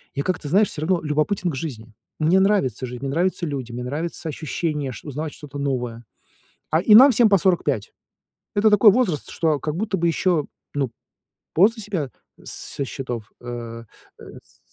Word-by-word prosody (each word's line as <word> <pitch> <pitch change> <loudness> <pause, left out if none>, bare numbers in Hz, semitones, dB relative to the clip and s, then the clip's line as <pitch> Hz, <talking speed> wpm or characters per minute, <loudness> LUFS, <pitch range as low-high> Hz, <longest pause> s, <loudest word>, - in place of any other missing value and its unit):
я 140 - -1
как-то, 165 -5 -2
знаешь, 200 +4 +4
всё 150 - -6
равно 175 +2 +1
любопытен 155 +5 0
к 140 - -5
жизни. 120 -7 -6 0.3
Мне 165 +5 +4
нравится 135 - +1
жизнь, 125 0 -7
мне 135 - -2
нравится 175 +2 0
люди, 135 -6 -4
мне 120 +1 -5
нравится 160 +5 -4
ощущение 150 -2 -3
ш 125 - -10
узнавать 150 +2 -4
что-то 145 -1 -9
новое. 125 -4 -2 0.7
А. 160 +2 +3
И 210 +2 +5
нам 265 +4 +10
всем 235 0 +5
по 200 - +5
45. 150 - +1 0.6
Это 215 +2 +5
такой 210 0 +7
возраст, 195 - 0
что 160 -3 +1
как 150 0 -3
будто 210 0 -1
бы 170 - +1
еще, 165 -2 +1 0.3
ну, 135 -4 -1 0.6
после 220 +6 +3
себя 170 - -3 0.3
со 140 - -4
счетов, 120 -5 -6
э, 115 -1 -7 0.4
с - - -14
155 Hz, 170 wpm, -23 LUFS, 130-185 Hz, 0.7 s, нам